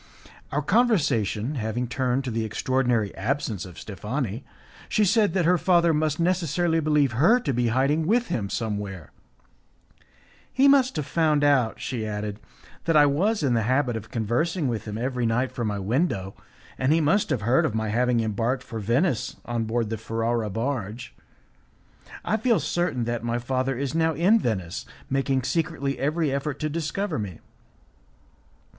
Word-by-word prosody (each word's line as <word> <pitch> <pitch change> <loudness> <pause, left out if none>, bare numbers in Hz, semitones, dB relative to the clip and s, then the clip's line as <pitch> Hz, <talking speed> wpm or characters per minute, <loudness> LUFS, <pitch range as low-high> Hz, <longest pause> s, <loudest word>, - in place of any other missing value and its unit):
Our 150 +1 -1
conversation 145 - +1
having 115 +3 -2
turned 130 +1 0
to 130 - -4
the 115 0 -1
extraordinary 120 -1 0
absence 110 -3 -2
of 90 -3 -12
Steffani, 110 - -4 0.5
she 215 - +3
said 205 0 +2
that 180 -3 +2
her 180 +1 +4
father 170 -2 +3
must 155 0 0
necessarily 170 -1 +1
believe 150 -4 +2
her 165 - +4
to 140 - -1
be 120 0 +1
hiding 140 +7 +1
with 235 +4 +3
him 100 -4 -2
somewhere. 100 -7 -4 1.4
"He 270 +2 +4
must 270 -2 +4
have 150 -3 -2
found 150 -1 +2
out," 135 -6 +2
she 120 -4 -3
added, 105 -1 -4 0.5
"that 165 -2 +3
I 145 - +7
was 180 +8 +1
in 130 -4 +2
the 115 - +2
habit 125 +2 +1
of 110 -1 -6
conversing 135 - -1
with 115 -4 -3
him 105 -1 -5
every 125 0 -1
night 125 +3 0
from 120 -2 -3
my 105 -1 -2
window, 100 - -1 0.5
and 130 +2 +2
he 160 - +4
must 165 +7 +2
have 125 - 0
heard 120 +5 +3
of 110 - -1
my 110 -1 -1
having 120 +1 +2
embarked 115 +4 -1
for 115 -3 -6
Venice 120 - 0
on 115 -1 -2
board 115 -1 -1
the 110 - -3
Ferrara 115 0 -1
barge. 115 +1 -4 1.1
I 220 - +1
feel 230 0 +2
certain 175 -8 -1
that 120 0 -2
my 120 0 -1
father 130 +1 -1
is 140 +1 -2
now 160 0 +2
in 190 +9 +4
Venice, 95 - -2 0.3
making 135 -1 +1
secretly 155 -2 -1
every 155 +1 0
effort 140 +1 -2
to 155 - 0
discover 165 - -2
me. 95 -5 -5
130 Hz, 165 wpm, -25 LUFS, 115-155 Hz, 1.4 s, I